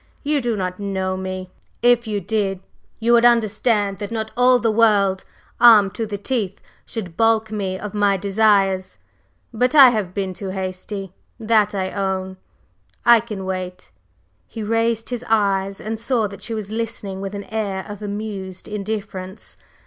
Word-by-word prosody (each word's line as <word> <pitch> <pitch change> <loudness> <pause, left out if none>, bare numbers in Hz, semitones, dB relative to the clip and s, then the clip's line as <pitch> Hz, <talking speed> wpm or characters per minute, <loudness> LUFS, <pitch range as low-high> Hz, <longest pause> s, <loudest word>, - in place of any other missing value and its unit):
You 295 -1 +1
do 240 -2 -1
not 185 -2 -3
know 190 -2 -2
me; 185 0 -5 0.3
if 240 -1 +4
you 210 -1 -1
did, 195 -1 -1 0.4
you 230 +1 +2
would 235 0 +5
understand 215 -3 +2
that 205 - -4
not 220 -1 -4
all 250 +1 +5
the 230 -2 +1
world, 205 -4 +3 0.3
armed 220 -5 +7
to 225 - -3
the 205 -1 -4
teeth 205 -3 -2 0.3
should 185 -8 -6
balk 225 0 +2
me 195 -3 -2
of 210 +2 -7
my 205 -1 +2
desires! 195 -1 +2 0.6
But 250 +6 +1
I 275 -3 +10
have 205 -6 -3
been 190 -2 -2
too 190 +2 -6
hasty 190 +1 -5 0.3
that 215 -2 +2
I 190 -1 -2
own, 190 -1 -2 0.7
I 235 -1 +8
can 210 -4 -6
wait." 185 - -5 0.6
He 220 - -6
raised 225 +1 0
his 245 -1 -4
eyes 195 -2 +1
and 220 +1 -4
saw 230 -1 0
that 200 - -11
she 230 - -5
was 210 -2 -5
listening 215 -4 -4
with 195 +1 -5
an 200 - -5
air 200 -4 -3
of 205 0 -8
amused 200 -3 -6
indifference. 200 -2 -6
205 Hz, 165 wpm, -21 LUFS, 190-225 Hz, 0.7 s, I